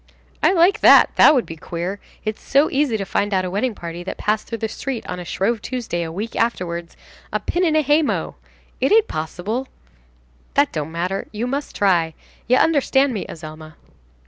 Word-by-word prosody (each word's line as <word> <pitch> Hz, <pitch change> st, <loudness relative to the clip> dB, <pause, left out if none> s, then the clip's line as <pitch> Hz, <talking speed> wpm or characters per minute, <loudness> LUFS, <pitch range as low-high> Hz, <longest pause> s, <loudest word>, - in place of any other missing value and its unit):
"I -, -, +5 dB
like 375 Hz, +3 st, +4 dB
that! -, -, +7 dB
that 305 Hz, -, +7 dB
would 250 Hz, -, +1 dB
be 165 Hz, -, -8 dB
queer. 175 Hz, +5 st, -5 dB, 0.3 s
It's 215 Hz, 0 st, -3 dB
so 280 Hz, +3 st, +2 dB
easy 270 Hz, -5 st, +1 dB
to 195 Hz, -, -4 dB
find 205 Hz, +1 st, 0 dB
out 185 Hz, 0 st, +1 dB
a 180 Hz, -, -4 dB
wedding 215 Hz, +4 st, -1 dB
party 170 Hz, -1 st, -7 dB
that -, -, -5 dB
passed 210 Hz, 0 st, -1 dB
through 230 Hz, -, -4 dB
the 220 Hz, -, -2 dB
street 250 Hz, +2 st, -5 dB
on 180 Hz, -, -4 dB
a -, -, -5 dB
Shrove 205 Hz, +6 st, -1 dB
Tuesday, 235 Hz, -10 st, -3 dB
a 165 Hz, -1 st, -4 dB
week 210 Hz, +7 st, -5 dB
afterwards. 170 Hz, -7 st, -2 dB, 0.3 s
A -, -, 0 dB
pin 355 Hz, -, -1 dB
in 320 Hz, -3 st, +2 dB
a 310 Hz, -, +3 dB
hay 295 Hz, +3 st, +4 dB
mow! 300 Hz, -, -2 dB, 0.5 s
It -, -, +1 dB
ain't 445 Hz, 0 st, +5 dB
possible!" 190 Hz, +11 st, -4 dB, 0.9 s
"That 285 Hz, 0 st, +3 dB
don't 155 Hz, 0 st, -3 dB
matter. 180 Hz, +4 st, -3 dB
You 220 Hz, +3 st, -3 dB
must 275 Hz, +3 st, -4 dB
try. 170 Hz, -5 st, +2 dB, 0.3 s
You 250 Hz, +2 st, +4 dB
understand 280 Hz, -3 st, +3 dB
me, 205 Hz, -, -4 dB
Azelma." 155 Hz, -1 st, -10 dB
215 Hz, 200 wpm, -21 LUFS, 175-270 Hz, 0.9 s, that